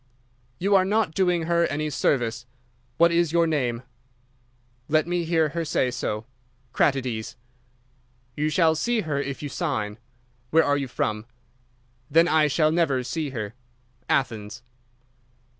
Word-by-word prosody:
_' -, -, -38 dB, 0.5 s
"'You 200 Hz, +3 st, +1 dB
are 190 Hz, -, +5 dB
not 205 Hz, -3 st, +1 dB
doing 180 Hz, -1 st, +1 dB
her 170 Hz, +1 st, +2 dB
any 150 Hz, +1 st, -2 dB
service. 120 Hz, -4 st, 0 dB, 0.5 s
What 170 Hz, 0 st, +5 dB
is 170 Hz, -2 st, +2 dB
your 170 Hz, 0 st, +3 dB
name?' 125 Hz, -7 st, -1 dB, 1.1 s
"'Let 155 Hz, +1 st, +3 dB
me 175 Hz, 0 st, -1 dB
hear 160 Hz, -2 st, +2 dB
her 165 Hz, +3 st, -3 dB
say 130 Hz, -5 st, 0 dB
so. 110 Hz, -3 st, -3 dB, 0.5 s
Kratides.' 125 Hz, -6 st, 0 dB, 1.0 s
"'You 150 Hz, +1 st, 0 dB
shall 160 Hz, 0 st, +3 dB
see 230 Hz, +8 st, 0 dB
her 150 Hz, -5 st, -2 dB
if 140 Hz, +1 st, -5 dB
you 145 Hz, -, -4 dB
sign. 120 Hz, -, -3 dB, 0.5 s
Where 160 Hz, +4 st, +4 dB
are 145 Hz, -, +2 dB
you 140 Hz, -1 st, -2 dB
from?' 110 Hz, -3 st, -2 dB, 0.8 s
"'Then 165 Hz, +4 st, +5 dB
I 155 Hz, -2 st, +4 dB
shall 155 Hz, +1 st, +2 dB
never 155 Hz, -6 st, +1 dB
see 155 Hz, +3 st, -3 dB
her. 110 Hz, -5 st, -5 dB, 0.6 s
_Athens. 115 Hz, -3 st, -1 dB
150 Hz, 140 wpm, -25 LUFS, 125-170 Hz, 1.1 s, are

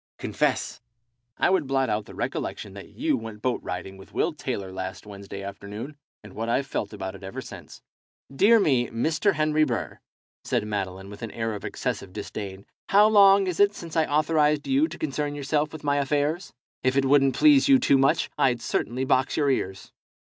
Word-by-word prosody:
Confess." -, -, -1 dB, 0.6 s
"I -, -, +3 dB
would 180 Hz, -7 st, +1 dB
blot 135 Hz, -1 st, +1 dB
out 105 Hz, 0 st, -1 dB
the -, -, -12 dB
recollection 100 Hz, -3 st, -4 dB
that 100 Hz, 0 st, -10 dB
you 305 Hz, +1 st, 0 dB
went 110 Hz, -, -8 dB
boat 125 Hz, -1 st, 0 dB
riding 90 Hz, +2 st, -6 dB
with 95 Hz, -, -15 dB
Will -, -, +1 dB
Taylor 95 Hz, -1 st, -4 dB
last 95 Hz, +1 st, -6 dB
Wednesday 100 Hz, -1 st, -8 dB
afternoon, 100 Hz, +8 st, -7 dB, 0.3 s
and 105 Hz, -2 st, -12 dB
what 115 Hz, +1 st, -4 dB
I've 135 Hz, +4 st, +1 dB
felt 105 Hz, -6 st, -3 dB
about 95 Hz, 0 st, -5 dB
it 100 Hz, -, -12 dB
ever 95 Hz, 0 st, -7 dB
since." -, -, -11 dB, 0.5 s
"Dear 225 Hz, +9 st, +6 dB
me, 130 Hz, -, +2 dB
Mr. 160 Hz, -, +1 dB
Henry 155 Hz, 0 st, +2 dB
Burr," 120 Hz, -7 st, -3 dB, 0.4 s
said -, -, -1 dB
Madeline, 95 Hz, -2 st, -4 dB
with 105 Hz, -, -11 dB
an 115 Hz, -, -4 dB
air 115 Hz, 0 st, -3 dB
of 105 Hz, -, -7 dB
excessive 95 Hz, -2 st, -4 dB
disdain, 100 Hz, -1 st, -7 dB, 0.2 s
"how 205 Hz, +2 st, +6 dB
long 200 Hz, -2 st, +6 dB
is 180 Hz, -3 st, -3 dB
it 205 Hz, 0 st, +4 dB
since 165 Hz, -2 st, -8 dB
I 160 Hz, -1 st, +2 dB
authorized 150 Hz, 0 st, +2 dB
you 275 Hz, +4 st, +3 dB
to -, -, -9 dB
concern 145 Hz, -1 st, -2 dB
yourself 145 Hz, +1 st, -1 dB
with 155 Hz, -, -9 dB
my 145 Hz, -1 st, +1 dB
affairs? 145 Hz, +5 st, 0 dB, 0.3 s
If 130 Hz, +1 st, +1 dB
it 135 Hz, -, +3 dB
wouldn't 135 Hz, -1 st, +4 dB
please 290 Hz, -3 st, +5 dB
you 270 Hz, -, +8 dB
too 140 Hz, -, +3 dB
much, 135 Hz, -, +3 dB
I'd 125 Hz, -3 st, +3 dB
certainly 125 Hz, +3 st, -2 dB
box 130 Hz, 0 st, +1 dB
your 145 Hz, -2 st, +3 dB
ears. 95 Hz, -7 st, -3 dB
135 Hz, 190 wpm, -25 LUFS, 105-155 Hz, 0.6 s, you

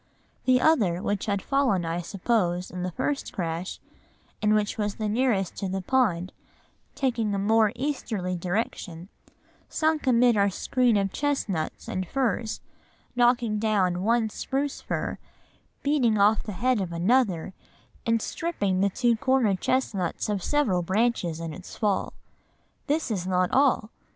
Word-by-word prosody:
The 255 Hz, -1 st, +5 dB
other, 215 Hz, -, +3 dB
which 200 Hz, +1 st, -2 dB
had 200 Hz, -2 st, -1 dB
fallen, 255 Hz, -11 st, +1 dB
I 165 Hz, +1 st, -2 dB
suppose, 180 Hz, -1 st, -1 dB
in 180 Hz, -, -5 dB
the 180 Hz, -, -1 dB
first 280 Hz, -, -2 dB
crash, 175 Hz, -3 st, -4 dB, 0.6 s
and 210 Hz, 0 st, +3 dB
which 210 Hz, -1 st, 0 dB
was 210 Hz, -2 st, -2 dB
the 215 Hz, -, -2 dB
nearest 210 Hz, -4 st, +1 dB
to 195 Hz, -, -3 dB
the 190 Hz, 0 st, -3 dB
pond, 185 Hz, -7 st, +1 dB, 0.6 s
taking 230 Hz, -6 st, 0 dB
a -, -, -1 dB
more 215 Hz, +1 st, +3 dB
easterly 220 Hz, -10 st, -2 dB
direction, 180 Hz, -1 st, -3 dB, 0.6 s
sunk 315 Hz, -2 st, 0 dB
amid 245 Hz, -1 st, +5 dB
our 200 Hz, -1 st, +3 dB
screen 245 Hz, +3 st, +1 dB
of 195 Hz, -1 st, 0 dB
chestnuts 230 Hz, -, -2 dB
and 185 Hz, -1 st, -3 dB
firs, 235 Hz, -4 st, -1 dB, 0.5 s
knocking 240 Hz, -3 st, +2 dB
down 195 Hz, -5 st, +1 dB
one 225 Hz, +1 st, +1 dB
spruce 275 Hz, +5 st, -3 dB
fir, -, -, -3 dB, 0.6 s
beating 265 Hz, -7 st, +2 dB
off 205 Hz, +2 st, +4 dB
the 210 Hz, -, -6 dB
head 250 Hz, +2 st, +1 dB
of 180 Hz, -3 st, -3 dB
another, 185 Hz, 0 st, +1 dB, 0.5 s
and 230 Hz, -1 st, +1 dB
stripping 205 Hz, -, -1 dB
the 200 Hz, -, +3 dB
two 240 Hz, +3 st, +2 dB
corner 255 Hz, -4 st, +2 dB
chestnuts 200 Hz, -4 st, -1 dB
of 205 Hz, -3 st, -1 dB
several 240 Hz, -12 st, +1 dB
branches 190 Hz, -3 st, 0 dB
in 165 Hz, -1 st, -5 dB
its 185 Hz, +2 st, -10 dB
fall. 205 Hz, -3 st, 0 dB, 0.7 s
This 295 Hz, -3 st, 0 dB
is 185 Hz, -4 st, -2 dB
not 180 Hz, -1 st, +1 dB
all. 260 Hz, -5 st, +2 dB
210 Hz, 145 wpm, -26 LUFS, 185-250 Hz, 0.7 s, The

